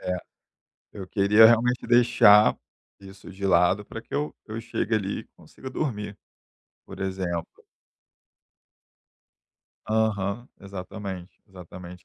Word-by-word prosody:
É, 90 Hz, 0 st, -2 dB, 0.8 s
eu 95 Hz, -3 st, -8 dB
queria 105 Hz, +3 st, +6 dB
realmente 120 Hz, +2 st, +2 dB
deixar 120 Hz, -3 st, +6 dB, 0.4 s
isso 95 Hz, 0 st, -13 dB
de 95 Hz, +1 st, -8 dB
lado 95 Hz, +2 st, +3 dB
para 115 Hz, -, -8 dB
que 115 Hz, -, -11 dB
eu 145 Hz, +1 st, -1 dB
que 110 Hz, -, -11 dB
eu 115 Hz, -, -4 dB
chegue 115 Hz, 0 st, -2 dB
ali 100 Hz, -2 st, -2 dB
e -, -, -14 dB
consiga 130 Hz, -, -11 dB
dormir, 105 Hz, -8 st, -4 dB, 0.7 s
por -, -, -11 dB
exemplo. 95 Hz, -3 st, -3 dB, 2.4 s
Aham, 110 Hz, +1 st, -1 dB
exatamente, 95 Hz, -1 st, -8 dB
exatamente. 90 Hz, -2 st, -12 dB
100 Hz, 115 wpm, -25 LUFS, 95-110 Hz, 2.4 s, queria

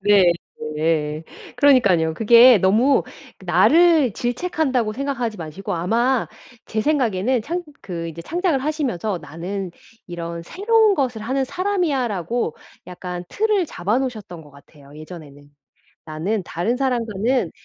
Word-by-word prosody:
네 195 Hz, -3 st, +5 dB, 0.4 s
네. 155 Hz, 0 st, -1 dB, 0.3 s
그러니깐요. 200 Hz, -, +4 dB
그게 235 Hz, +2 st, +7 dB
너무 220 Hz, +10 st, +3 dB, 0.4 s
나를 325 Hz, -, +4 dB
질책한다고 250 Hz, -, -1 dB
생각하지 250 Hz, -4 st, -3 dB
마시고 175 Hz, +5 st, -5 dB
아마 235 Hz, +9 st, 0 dB, 0.4 s
제 220 Hz, -, -2 dB
생각에는 245 Hz, -4 st, +1 dB
창 345 Hz, +7 st, -3 dB, 0.2 s
그 170 Hz, -3 st, -5 dB
이제 165 Hz, +1 st, -8 dB
창작을 345 Hz, -, 0 dB
하시면서 250 Hz, -, -2 dB
'나는 175 Hz, +5 st, -6 dB, 0.3 s
이런 170 Hz, -1 st, -6 dB
새로운 425 Hz, -, +2 dB
것을 250 Hz, -7 st, -2 dB
하는 265 Hz, +4 st, -1 dB
사람이야.' 350 Hz, -8 st, -1 dB
라고 190 Hz, -1 st, -3 dB, 0.3 s
약간 180 Hz, 0 st, -7 dB
틀을 420 Hz, -5 st, +1 dB
잡아 210 Hz, +4 st, -1 dB
놓으셨던 215 Hz, -10 st, -5 dB
것 150 Hz, -, -17 dB
같아요 140 Hz, 0 st, -18 dB
예전에는. 150 Hz, -3 st, -12 dB, 0.6 s
'나는 175 Hz, +7 st, -2 dB
다른 210 Hz, +10 st, -2 dB
사람과는 235 Hz, -, 0 dB
220 Hz, 290 characters per minute, -21 LUFS, 175-265 Hz, 0.6 s, 그게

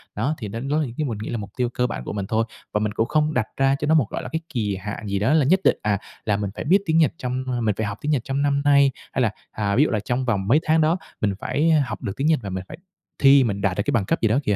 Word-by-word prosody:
Đó, 130 Hz, +9 st, 0 dB
thì 110 Hz, -, -6 dB
đến 115 Hz, +6 st, -5 dB
đó 150 Hz, +2 st, +2 dB
thì 120 Hz, -, -7 dB
cái 155 Hz, -, 0 dB
mình 115 Hz, -5 st, -3 dB
nghĩ -, -, -5 dB
là 120 Hz, -, -2 dB
mục 100 Hz, -2 st, -6 dB
tiêu 125 Hz, -2 st, +1 dB
cơ 125 Hz, +1 st, 0 dB
bản 60 Hz, -, -5 dB
của -, -, -5 dB
mình 100 Hz, -2 st, -3 dB
thôi 115 Hz, 0 st, +1 dB, 0.3 s
và 105 Hz, -, +2 dB
mình 105 Hz, 0 st, -1 dB
cũng 115 Hz, -, +1 dB
không 155 Hz, +2 st, +1 dB
đặt 110 Hz, -6 st, +1 dB
ra 135 Hz, 0 st, +3 dB
cho 150 Hz, -, -2 dB
nó 160 Hz, -, +4 dB
một, 140 Hz, -9 st, +3 dB
gọi -, -, -4 dB
là, 125 Hz, -, -6 dB
cái 160 Hz, -, -1 dB
kỳ 105 Hz, -5 st, -1 dB
hạn 105 Hz, +2 st, -6 dB
gì 100 Hz, 0 st, -1 dB
đó 110 Hz, +9 st, +2 dB
là 155 Hz, -4 st, +4 dB
nhất 185 Hz, +6 st, +4 dB
định, -, -, +4 dB
à, 105 Hz, -1 st, +1 dB, 0.3 s
là 105 Hz, -2 st, +1 dB
mình 100 Hz, -2 st, -2 dB
phải -, -, -4 dB
biết 175 Hz, +6 st, +5 dB
tiếng 160 Hz, -2 st, +2 dB
Nhật 160 Hz, -2 st, +4 dB
trong, 130 Hz, +1 st, -3 dB
ưm, 120 Hz, -3 st, -2 dB
mình 105 Hz, -, +1 dB
phải 110 Hz, -, -2 dB
học 100 Hz, 0 st, -4 dB
tiếng 150 Hz, -, -1 dB
Nhật 135 Hz, -6 st, +1 dB
trong 135 Hz, +2 st, -2 dB
năm 140 Hz, 0 st, +1 dB
nay, 140 Hz, -1 st, +5 dB, 0.2 s
hay 130 Hz, -, 0 dB
là, 110 Hz, -4 st, +2 dB, 0.2 s
à, 100 Hz, -2 st, -1 dB
ví 140 Hz, -, +5 dB
dụ -, -, +1 dB
là 110 Hz, -, 0 dB
trong 125 Hz, +5 st, -2 dB
vòng 100 Hz, -5 st, 0 dB
mấy 140 Hz, +8 st, +5 dB
tháng 160 Hz, +1 st, +3 dB
đó 160 Hz, +3 st, +3 dB, 0.2 s
mình 100 Hz, -2 st, +1 dB
phải, 160 Hz, +3 st, 0 dB
a, 155 Hz, -3 st, +4 dB
học 105 Hz, -, -6 dB
được 100 Hz, -, -3 dB
tiếng 140 Hz, +3 st, 0 dB
Nhật 160 Hz, -4 st, +3 dB
và 100 Hz, -, -4 dB
mình 95 Hz, 0 st, -4 dB
phải 155 Hz, -, -9 dB, 0.4 s
thi, 135 Hz, -1 st, +7 dB
mình 100 Hz, -4 st, -2 dB
đạt 95 Hz, -1 st, 0 dB
được 100 Hz, -, +1 dB
cái -, -, 0 dB
bằng 115 Hz, -7 st, +1 dB
cấp -, -, -1 dB
gì 110 Hz, -, +3 dB
đó 115 Hz, +6 st, +2 dB
kìa. 105 Hz, -3 st, +1 dB
125 Hz, 340 wpm, -23 LUFS, 105-145 Hz, 0.4 s, thi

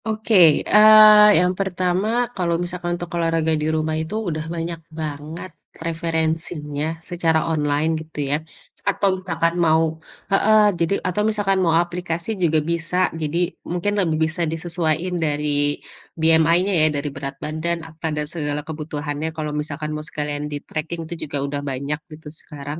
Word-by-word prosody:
Oke, 220 Hz, +1 st, -2 dB, 0.3 s
eee, 215 Hz, 0 st, +8 dB
yang 180 Hz, +1 st, +2 dB
pertama 185 Hz, +1 st, 0 dB, 0.3 s
kalau 175 Hz, -3 st, 0 dB
misalkan 175 Hz, 0 st, -3 dB
untuk 175 Hz, -1 st, -7 dB
olahraga 165 Hz, -1 st, +1 dB
di 155 Hz, -, 0 dB
rumah 155 Hz, 0 st, -1 dB
itu, 160 Hz, +6 st, -5 dB
udah 155 Hz, -1 st, -3 dB
banyak 165 Hz, 0 st, -4 dB, 0.2 s
banget 155 Hz, +3 st, -6 dB, 0.4 s
referensinya 160 Hz, -2 st, -2 dB
secara 165 Hz, -3 st, +1 dB
online 150 Hz, 0 st, +1 dB
gitu 155 Hz, -1 st, -10 dB
ya, 145 Hz, -, +2 dB, 0.5 s
atau 200 Hz, 0 st, +1 dB
misalkan 165 Hz, -2 st, -1 dB
mau 160 Hz, 0 st, +4 dB, 0.5 s
heeh, 215 Hz, +2 st, +5 dB, 0.2 s
jadi 170 Hz, +3 st, +1 dB
atau 185 Hz, +3 st, 0 dB
misalkan 200 Hz, -3 st, +1 dB
mau 165 Hz, -1 st, +3 dB
aplikasi 175 Hz, 0 st, -5 dB
juga 160 Hz, -2 st, +3 dB
bisa. 170 Hz, +1 st, -2 dB, 0.2 s
Jadi 155 Hz, +2 st, -2 dB, 0.3 s
mungkin 180 Hz, +4 st, -1 dB
lebih 160 Hz, -4 st, 0 dB
bisa 160 Hz, +2 st, -4 dB
disesuaiin 165 Hz, +1 st, -2 dB
dari 145 Hz, -1 st, 0 dB, 0.4 s
BMI-nya 165 Hz, +4 st, +3 dB
ya, 155 Hz, -, +5 dB
dari 140 Hz, +1 st, -3 dB
berat 140 Hz, -1 st, -5 dB
badan, 155 Hz, +4 st, -3 dB
apa 160 Hz, +1 st, -5 dB
dan 150 Hz, -1 st, -2 dB
segala 150 Hz, -2 st, -3 dB
kebutuhannya 150 Hz, -1 st, -4 dB
kalau 150 Hz, -1 st, -3 dB
misalkan 150 Hz, 0 st, -5 dB
mau 150 Hz, -, -4 dB
sekalian 150 Hz, 0 st, -3 dB
di-tracking 155 Hz, +3 st, -5 dB
itu 165 Hz, -, -6 dB, 0.2 s
juga 145 Hz, -, -3 dB
udah 140 Hz, 0 st, -3 dB
banyak 140 Hz, +3 st, -3 dB
gitu 155 Hz, 0 st, -11 dB
sekarang. 145 Hz, 0 st, -7 dB
160 Hz, 145 wpm, -21 LUFS, 150-175 Hz, 0.5 s, eee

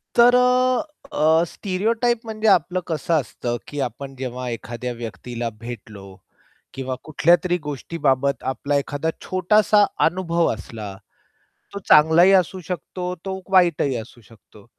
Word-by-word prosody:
तर 240 Hz, +1 st, +6 dB
अ, 250 Hz, +2 st, +3 dB, 0.3 s
अ, 160 Hz, +2 st, +3 dB
स्टिरियोटाइप 225 Hz, +6 st, -1 dB
म्हणजे 220 Hz, -1 st, -2 dB
आपलं 185 Hz, -1 st, +3 dB
कसं 160 Hz, 0 st, -2 dB
असतं 120 Hz, -5 st, -1 dB
की 145 Hz, -, -6 dB
आपण 135 Hz, +2 st, -5 dB
जेव्हा 125 Hz, -1 st, -5 dB
एखाद्या 120 Hz, +1 st, -5 dB
व्यक्तीला 120 Hz, +1 st, -5 dB
भेटलो 110 Hz, -4 st, -9 dB, 0.7 s
किंवा 130 Hz, -1 st, -4 dB
कुठल्यातरी 175 Hz, +4 st, +2 dB
गोष्टीबाबत 140 Hz, -1 st, -1 dB
आपला 140 Hz, +2 st, -2 dB
एखादा 145 Hz, +3 st, -2 dB
छोटासा 205 Hz, +3 st, +3 dB, 0.2 s
अनुभव 170 Hz, -2 st, +1 dB
असला, 105 Hz, -2 st, -8 dB, 0.8 s
तो 200 Hz, -, -4 dB
चांगलाही 160 Hz, +5 st, +6 dB
असू 185 Hz, 0 st, +2 dB
शकतो 180 Hz, 0 st, -4 dB
तो 190 Hz, 0 st, -4 dB
वाईटही 170 Hz, -7 st, +3 dB
असू 115 Hz, +1 st, -10 dB
शकतो. 105 Hz, -1 st, -19 dB
155 Hz, 120 wpm, -22 LUFS, 125-185 Hz, 0.8 s, तर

